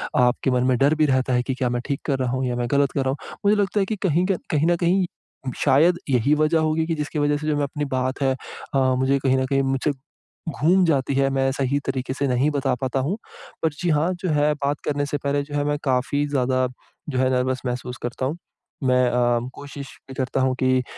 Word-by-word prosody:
आपके 125 +1 +2
मन 125 0 +2
में 130 -1 +3
डर 140 +5 +3
भी 155 0 +3
रहता 130 -2 +1
है 125 0 +2
कि 130 - -2
क्या 125 -1 0
मैं 120 0 -1
ठीक 140 -2 -2
कर 140 - +1
रहा 130 -2 0
हूँ 130 +1 -1
या 125 -1 -1
मैं 120 0 -1
गलत 140 0 +3
कर 140 - -1
रहा - - +1
हूँ? 135 - -6
मुझे 205 +1 +5
लगता 200 +1 0
है 195 - +2
कि 220 - -2
कहीं 180 -3 +1
क 190 - +1
कहीं 155 +1 +2
न 175 - +4
कहीं, 180 +2 +2 0.5
शायद 165 +6 +4
यही 130 +2 +3
वज़ह 155 +2 +2
होगी 155 0 +1
कि 165 - 0
जिसकी 150 0 -3
वज़ह 145 0 +2
से 155 +1 -5
जो 155 - +2
मैं 145 - 0
अपनी 145 +1 -3
बात 130 +1 -1
है 135 -1 +3 0.4
अ, - - +4 0.2
मुझे 130 +1 +2
कहीं 130 -1 +2
न 130 - +1
कहीं 135 +1 +1
मुझसे 135 +2 0 0.6
घूम 170 +5 +3
जाती 140 -4 +1
है, 135 0 +3
मैं 135 0 +1
सही 140 +1 0
तरीके 130 0 -2
से 140 +1 -1
नहीं 130 +3 +2
बता 135 -2 0
पाता 130 0 -1
हूँ। 155 +10 -1 0.5
पर 160 - +4
जी 175 - 0
हाँ, 155 +3 +2
जो 180 0 -4
है, 150 0 +3
बात 145 -1 -2
करने 145 -1 0
से 145 +1 -2
पहले 140 +1 -1
जो 145 0 -7
है, 145 - +1
मैं 145 0 0
काफ़ी 135 +2 +1
ज़्यादा 130 -2 +1 0.4
जो 130 - -2
है, 130 0 +3
नर्वस 130 0 0
महसूस 125 0 -4
करता 120 +2 -3
हूँ। 145 +6 -2 0.5
मैं 125 -1 +3
अ, 120 -1 +2
कोशिश 140 -1 -9 0.2
भी - - -7
करता 130 0 -1
हूँ 130 0 +2
कि 130 0 +3
अ, - - -2
140 Hz, 250 wpm, -23 LUFS, 130-150 Hz, 0.6 s, मुझे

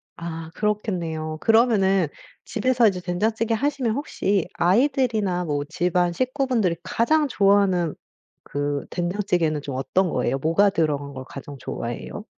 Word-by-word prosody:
아 165 -1 -6
그렇겠네요. 170 -7 -2
그러면은 200 -6 +4 0.4
집에서 240 0 +2
이제 185 -3 0
된장찌개 220 +6 0
하시면 270 -2 0
혹시 200 - -1
아이들이나 215 -4 +2
뭐 145 -2 -1
집안 175 +1 +1
식구분들이 255 - 0
가장 295 +10 +2
좋아하는 195 - +3 0.5
그 145 0 -2
된장찌개는 175 -4 0
좀 140 -3 -5
어떤 175 +7 +1
거예요? 135 - 0
뭐가 165 +8 +3
들어간 145 -6 -1
걸 130 -1 -7
가장 140 0 -9
좋아해요? 120 - -5
185 Hz, 325 characters per minute, -23 LUFS, 160-220 Hz, 0.5 s, 그러면은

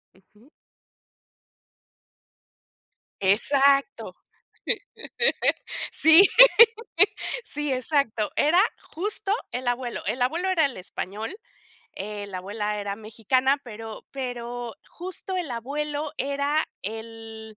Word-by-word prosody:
Ujú. 210 +7 -25 2.7
Exacto. 270 +1 +2 1.8
Sí. 325 +5 +7 1.2
Sí, 295 -1 -3
exacto. 255 -4 0
Era 330 +5 +4 0.2
justo 395 +3 -4 0.2
el 250 +1 -5
abuelo. 245 0 -3
El 240 +5 -1
abuelo 335 +9 0
era 335 -5 +3
el 270 - -7
español, 200 - -6 0.6
eh, 205 +1 -6
la 190 -2 -6
abuela 210 +2 -4
era 200 -1 -4
mexicana, 235 +5 0
pero 225 -2 -9
pero, 245 -3 -6
justo 370 +2 -7
el 350 -6 -3
abuelo 290 +5 -4
era 280 +3 0 0.2
el 220 0 -8
245 Hz, 90 wpm, -25 LUFS, 220-290 Hz, 2.7 s, Sí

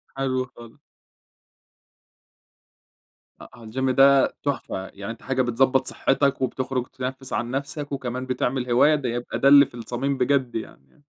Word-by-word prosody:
حلو 130 -1 -1
خالص. 115 -1 -15 2.6
أ 120 -1 -14
الجيم 130 +4 -2
ده 135 +1 +5
تحفة، 120 -9 -3
يعني 100 +3 -7
أنت 115 - -11
حاجة 130 -1 0
بتضَبّط 130 +2 +2
صحتك 140 0 +1
وبتخرج 130 -1 -2
تنَفّس 130 +1 -6
عن 120 0 -2
نَفسك 145 +2 -4
وكمان 130 -2 -4
بتعمل 125 0 -2
هواية، 145 +6 +5
ده 130 -5 -2
يبقى 120 0 -4
ده 135 - +3
اللي 140 0 +8
في - - -18
الصميم 125 +4 -3
بجد 130 -1 +1
يعني 70 -11 -8
آه. - - -27
130 Hz, 145 wpm, -24 LUFS, 120-135 Hz, 2.6 s, اللي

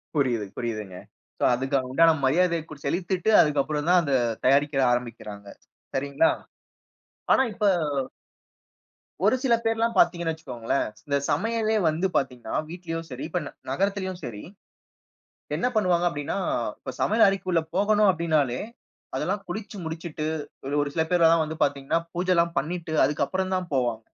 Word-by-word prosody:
புரியுது, 120 -7 +1
புரியுதுங்க. 110 -6 -4 0.4
சோ - - -2
அதுக்கு 135 +2 0
உண்டான 165 +5 +5
மரியாதைய 170 +4 +2 0.2
செலுத்திட்டு 180 +6 -1
அதுக்கு 145 -2 +2
அப்புறம் 150 +1 -3
தான் 180 0 +6
அத 140 -3 -1 0.3
தயாரிக்க 140 0 +3
ஆரம்பிக்கிறாங்க. 105 -4 -5 0.5
சரிங்களா? 140 +4 +2 1.0
ஆனா - - +5
இப்ப 210 - -3 1.6
ஒரு 215 +5 +5
சில 245 -3 +3
பேர்ல்லாம் 225 0 0
பார்த்தீங்கன்னா 170 -2 +3
வச்சுக்கோங்களேன். 130 -5 -2 0.2
இந்த 140 0 +2
சமையலே 225 -1 +1
வந்து 165 +5 +1
பார்த்தீங்கன்னா, 125 -3 -3 0.2
வீட்டிலயும் 165 -2 -5
சரி 130 +2 -7
இப்ப 180 - -1 0.3
நகரத்திலும் 190 +3 -1
சரி. 105 -4 -7 1.1
என்ன 250 - 0
பண்ணுவாங்க 180 -4 +2
அப்டின்னா, 145 +2 -4 0.4
இப்ப - - -7
சமையல் 220 +1 +4
அறைக்குள்ள 185 -3 +1
போகணும் 205 +1 +3
அப்டின்னாலே 155 -7 +1 0.6
அதெல்லாம் 195 +6 -1
குளிச்சு 210 +3 -6
முடிச்சுட்டு 160 -1 -5 0.4
ஒரு 145 - -2
ஒரு 145 - 0
சில 160 -1 +2
பேர்ல்லாம் 165 -2 +5
வந்து 160 +1 -6
பார்த்தீங்கன்னா, 140 +4 +1
பூஜைல்லாம் 170 -1 +1
பண்ணிட்டு 165 +1 -3
அதுக்கு 145 +2 +1
அப்புறம் 190 0 -1
தான் 180 -3 -4
போவாங்க. 120 -4 0
165 Hz, 130 wpm, -25 LUFS, 140-185 Hz, 1.6 s, தான்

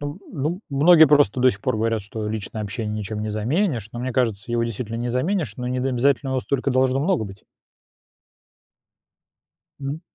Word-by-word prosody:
Ну 145 +4 -5
ну, 160 +4 -2
многие 160 +3 +7
просто 145 -5 +4
до 130 +1 +6
сих 100 - -9
пор - - 0
говорят, 115 0 0
что 105 +2 -5
личное 110 0 -4
общение 105 +1 -4
ничем 105 +1 -4
не 110 0 -3
заменишь, 120 - 0
но 120 - -7
мне 130 +1 -3
кажется, 115 -3 -1
его 120 0 +1
действительно 115 0 -4
не 120 +1 -2
заменишь, 155 +8 -1
но 125 -2 -4
не 125 0 -1
д 130 - 0
обязательно 135 +2 +1
его 130 -1 0
столько 140 +1 -1
должно 130 +1 +2
много 150 - +1
быть. 95 -1 -11 2.4
М. 140 +3 -4
125 Hz, 185 wpm, -23 LUFS, 110-140 Hz, 2.4 s, многие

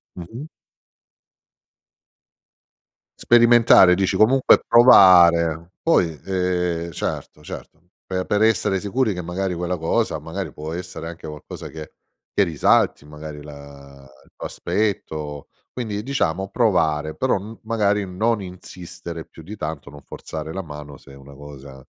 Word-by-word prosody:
Mh-mh. 110 - -8 2.7
Sperimentare 120 -5 +6
dici, 95 +1 0
comunque 130 +5 +4
provare 85 -8 +6
poi, 85 - +2
ehm 90 -3 -1
Certo, 75 0 -5
certo, 80 - -10 0.3
per 95 -1 -3
per 105 0 0
essere 110 -3 +2
sicuri 110 +3 -1
che, 90 - -5
magari, 90 +2 -3
quella 90 +1 -3
cosa 80 0 -1
magari - - -6
può 75 +2 -7
essere 85 -2 -7
anche 85 -1 -9
qualcosa 75 -2 -9
che 80 -1 -10 0.4
che - - +3
risalti, 80 -3 +1
magari, 75 0 -10
la 70 -2 -13
il - - -27
tuo - - -6
aspetto. 75 -9 -3 0.2
Quindi 110 -5 -4
diciamo 95 -7 -2
provare, 80 -10 +1
però 130 -4 +1
m 105 +4 -10
magari 105 -2 0
non 105 +4 -1
insistere 85 -2 -9
più 80 - -15
di 100 +7 -9
tanto, 75 -7 -6
non 70 0 -13
forzare 80 +2 -8
la 95 +3 -5
mano 75 -3 -10
se 70 - -17
è - - -13
una 70 +1 -14
cosa 70 -2 -12
90 Hz, 135 wpm, -21 LUFS, 75-100 Hz, 2.7 s, Sperimentare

